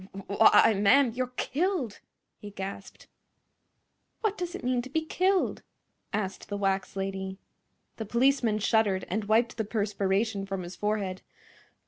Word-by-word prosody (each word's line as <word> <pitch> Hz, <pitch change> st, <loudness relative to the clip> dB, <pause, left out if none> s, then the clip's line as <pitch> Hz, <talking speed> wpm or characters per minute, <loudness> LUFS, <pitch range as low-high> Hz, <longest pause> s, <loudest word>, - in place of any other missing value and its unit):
"Why—why, 220 Hz, +2 st, +6 dB
ma'am, 250 Hz, +5 st, +5 dB
you're 250 Hz, +1 st, -3 dB
killed!" 310 Hz, -, -1 dB, 0.4 s
he 205 Hz, -, -8 dB
gasped. 195 Hz, 0 st, -8 dB, 1.2 s
"What 430 Hz, -3 st, 0 dB
does 355 Hz, -1 st, -4 dB
it -, -, -8 dB
mean 250 Hz, 0 st, +1 dB
to 260 Hz, -, -9 dB
be 315 Hz, +3 st, -1 dB
killed?" 370 Hz, +3 st, +1 dB, 0.5 s
asked 195 Hz, -2 st, -3 dB
the 205 Hz, -, -3 dB
wax 195 Hz, -1 st, -1 dB
lady. 190 Hz, 0 st, -4 dB, 0.6 s
The 220 Hz, -, -4 dB
policeman 235 Hz, -1 st, +2 dB
shuddered 210 Hz, -3 st, +2 dB
and 210 Hz, +3 st, -1 dB
wiped 225 Hz, +2 st, +2 dB
the 220 Hz, -, 0 dB
perspiration 205 Hz, -1 st, -1 dB
from 195 Hz, -2 st, -3 dB
his 175 Hz, +1 st, -8 dB
forehead. 205 Hz, -3 st, -2 dB
215 Hz, 135 wpm, -28 LUFS, 195-250 Hz, 1.2 s, Why—why